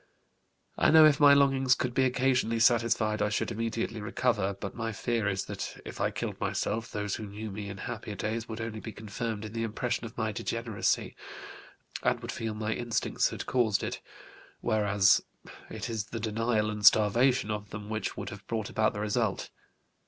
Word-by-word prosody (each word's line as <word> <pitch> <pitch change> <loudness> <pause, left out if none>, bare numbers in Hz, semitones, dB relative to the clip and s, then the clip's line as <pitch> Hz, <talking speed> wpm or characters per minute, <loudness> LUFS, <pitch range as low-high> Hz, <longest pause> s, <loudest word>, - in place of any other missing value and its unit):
I - - +5
know 160 0 +9
if 150 -2 +5
my 145 -1 +8
longings 135 -2 +4
could 125 -1 -2
be 130 - +3
occasionally 125 -2 +1
satisfied 115 -2 +3
I 105 - +2
should 105 - -1
immediately 115 0 -2
recover, 105 -2 0
but 100 - -5
my 115 -1 -3
fear 115 0 -1
is 95 -1 -1
that - - -6
if - - -7
I - - +2
killed - - -5
myself 115 +2 -2
those 105 -2 -3
who 110 - -6
knew 105 +2 -6
me 100 0 -6
in 100 - -7
happier 110 -1 -6
days 110 +4 -3
would 110 0 -5
only 115 -1 -4
be 110 0 -7
confirmed 110 +1 -4
in 105 - -8
the 115 - -2
impression 115 +2 -2
of 115 - -10
my 110 -1 0
degeneracy 115 0 -1 0.9
and - - +1
would - - -5
feel 110 -1 -4
my 110 0 -1
instincts 120 -1 0
had - - -6
caused 115 -5 +1
it, - - -4 0.6
whereas 105 -3 +3 0.5
it 110 +1 -5
is 110 -3 -3
the 115 - -6
denial 110 0 0
and 105 0 -6
starvation 110 +2 +5
of 105 -1 -4
them 105 0 -7
which 110 0 -3
would 100 -1 -4
have 100 -1 -11
brought 110 -2 -3
about 110 -1 +2
the 105 - -5
result. 105 -1 -1
110 Hz, 190 wpm, -29 LUFS, 105-120 Hz, 0.9 s, know